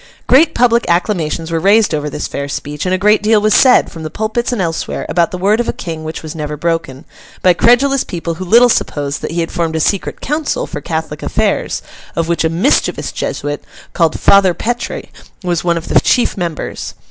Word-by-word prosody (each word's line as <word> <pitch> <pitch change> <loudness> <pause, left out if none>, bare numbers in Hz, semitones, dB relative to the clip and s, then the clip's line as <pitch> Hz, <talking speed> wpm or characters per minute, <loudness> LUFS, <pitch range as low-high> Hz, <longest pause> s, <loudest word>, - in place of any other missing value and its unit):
Great 290 +6 +4
public 235 -1 +3
acclamations 170 -3 0
were 165 - 0
raised 200 +2 +3
over 150 -1 -2
this - - -4
fair 140 0 -5
speech, 150 +4 -4
and 185 - +2
a - - -1
great 210 +2 +3
deal 215 0 +3
was 215 0 +2
said, 255 +2 +5
from 165 - -9
the 155 - -5
pulpits 220 +7 -2
and 245 - -2
elsewhere, 165 -3 -2
about 170 -2 +1
the 180 - -5
word 200 +5 +2
of 240 - -1
a - - 0
King 160 -3 -6
which 160 +1 -6
was 155 -1 -6
never 150 -2 -5
broken, 165 -3 -2 0.4
by 180 - +6
credulous 250 +7 +3
people 170 -2 -4
who 175 +3 -6
little 235 +7 +6
supposed 145 -10 -1
that - - -4
he 170 +2 -1
had 165 - -3
formed 165 -2 -2
a - - 0
secret 195 +5 -1
council 310 - -2
for - - -6
Catholic - - -4
affairs, - - -1 0.3
of 165 -1 -1
which 170 -1 0
a 160 - +2
mischievous 180 - +1
Jesuit, 145 0 -4 0.3
called 165 -2 +1
Father 195 -3 +5
Petre, 240 +1 -3 0.4
was 175 -2 -1
one 170 -1 +1
of 165 - -6
the - - +4
chief 245 - +1
members. 170 -4 -4
175 Hz, 210 wpm, -15 LUFS, 160-220 Hz, 0.4 s, by